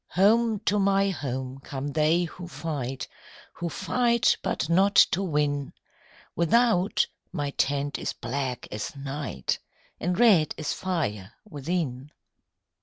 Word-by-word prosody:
"Home 220 +3 +4
to 210 -1 +1
my 195 0 +3
home 130 -4 -4
come 135 +1 -5
they 155 +4 +2
who 175 +1 -7
fight, 135 -7 -4 0.5
Who 175 - -4
fight 235 +6 +2
but - - -1
not 190 +4 +3 0.2
to 190 - +1
win: 145 -5 0 0.6
Without, 200 +2 +3 0.3
my 145 -5 -2
tent 140 +1 0
is - - -2
black 125 +1 -4
as 105 +6 -5
night, 135 - -3 0.4
And 180 +1 -1
red 195 -11 +5
as 155 -2 -2
fire 125 - -3
within. 145 -5 -3
155 Hz, 120 wpm, -27 LUFS, 135-190 Hz, 0.6 s, red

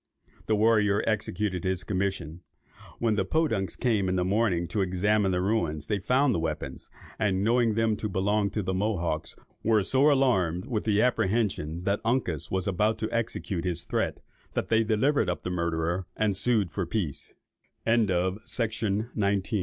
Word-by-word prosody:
The 110 - +3
warrior 105 -1 +3
executed 105 -4 -1
his 95 -1 -1
commission. 95 -4 -2 0.6
When 115 -2 +1
the 105 - +1
Podunks 110 - 0
came 105 -7 +1
in 90 - 0
the 90 -1 +1
morning 95 -4 +1
to 105 - -1
examine 95 +2 +1
the 90 0 0
ruins 85 -7 0
they 105 -2 -1
found 130 +6 +2
the 85 - 0
weapons, 80 -1 -4 0.3
and 100 -3 +1
knowing 115 0 +2
them 115 -1 +2
to 105 - -3
belong 100 +2 +1
to 105 +1 -3
the 95 - -2
Mohawks, 90 -6 -1 0.3
were 110 -2 +3
so 135 +8 +4
alarmed 95 - +2
with 120 -5 -2
the 105 -1 +3
apprehension 95 -8 0
that 100 +3 0
Uncas 115 - 0
was 95 +1 -1
about 105 +3 +1
to 110 0 -3
execute 110 -6 -2
his 85 -2 0
threat, - - -2 0.3
that - - -1
they 115 0 +4
delivered 110 +1 +2
up 90 - -3
the 90 - -3
murderer, 85 +1 -1
and 105 -2 +1
sued 100 -2 +1
for 95 -2 -3
100 Hz, 155 wpm, -27 LUFS, 90-110 Hz, 0.6 s, so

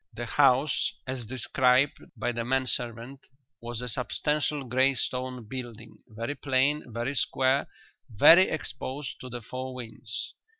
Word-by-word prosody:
The 120 - -4
house, 135 +2 +3
as 130 -3 -5
described 130 +2 +2 0.2
by 120 +3 -1
the 120 -1 -3
man 130 +2 +1
servant, 120 +2 -4 0.3
was 120 0 -5
a 125 - -4
substantial 145 +4 -1
grey 130 +2 +2
stone 125 -2 -2
building, 120 -2 -8
very 115 +4 -4
plain, 135 0 0
very 120 +4 -2
square, 135 0 +1 0.4
very 165 - +7
exposed 145 -2 -4
to 130 - -7
the 120 0 -6
four 130 +3 -6
winds. 120 -3 -6
130 Hz, 135 wpm, -28 LUFS, 120-135 Hz, 0.4 s, very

